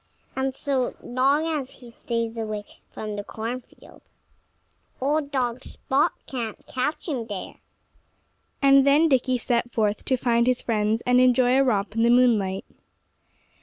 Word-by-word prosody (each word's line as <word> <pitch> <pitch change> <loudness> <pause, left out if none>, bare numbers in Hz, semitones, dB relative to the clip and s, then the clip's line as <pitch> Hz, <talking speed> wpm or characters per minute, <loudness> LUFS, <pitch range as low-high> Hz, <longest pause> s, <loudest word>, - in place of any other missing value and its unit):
And 265 0 -1
so 270 -3 -1
long 270 +5 +1
as 300 -5 -2
he 245 -2 -14
stays 230 -1 -3
away 215 -2 -4 0.3
from 215 -1 -6
the 205 - -4
cornfield, 230 +4 -8 1.0
old 285 +2 0
dog 255 -2 -2
Spot 275 +2 0
can't 235 -5 -5
catch 275 +7 -3
him 250 -8 -3
there." 205 -4 -7 1.1
And 275 0 +7
then 290 +4 +4
Dickie 255 -2 +2
set 240 0 -1
forth 210 -2 0
to 260 - +1
find 235 -1 +2
his 255 -1 +2
friends 220 0 0
and 250 0 +4
enjoy 250 0 +4
a 270 - +5
romp 210 -5 0
in 225 - 0
the 235 - +4
moonlight. 225 -6 +3
245 Hz, 145 wpm, -24 LUFS, 225-265 Hz, 1.1 s, And